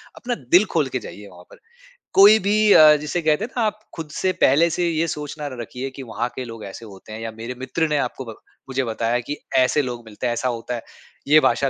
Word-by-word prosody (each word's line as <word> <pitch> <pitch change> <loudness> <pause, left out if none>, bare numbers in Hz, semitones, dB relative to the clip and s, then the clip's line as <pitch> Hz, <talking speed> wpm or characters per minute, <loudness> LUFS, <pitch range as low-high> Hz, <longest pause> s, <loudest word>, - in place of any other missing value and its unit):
अपना 245 0 -3 0.2
दिल 185 +4 +7
खोल 155 -5 +1
के 130 - -2
जाइए 105 -2 -10
वहाँ 90 -2 -15
पर - - -16 0.6
कोई 205 +3 +8
भी 200 +1 0 0.2
अ, 155 -1 +8
जिसे 150 +4 -3
कहते 155 +6 +1
हैं 250 - -12
ना - - +1
आप 215 0 -2 0.2
खुद 160 -2 -7
से 185 +4 0
पहले 160 +6 +5
से 175 +1 -1
ये 165 0 0
सोच 150 -1 -5
ना 150 - -4
र 130 -3 -8
रखिए 125 +4 -6
कि 135 - -7
वहाँ 120 0 -3
के 130 - -4
लोग 115 -2 -9
ऐसे 100 +4 -9
होते 100 +1 -12
हैं 110 - -7
या 115 0 -5
मेरे 115 +3 -6
मित्र 155 +5 -1
ने 150 -1 0
आपको 130 0 -3
ब 115 -2 -8 0.3
मुझे 130 0 -1
बताया 115 +1 -1
कि 145 +5 -5 0.2
ऐसे 130 +3 +3
लोग 120 -3 -5
मिलते 110 +3 -7
हैं, 120 - 0
ऐसा 130 +2 -2
होता 120 +1 -4
है। 115 - -6 0.5
ये 150 +2 +7
भाषा 140 -2 +2
135 Hz, 250 wpm, -22 LUFS, 115-160 Hz, 0.6 s, कोई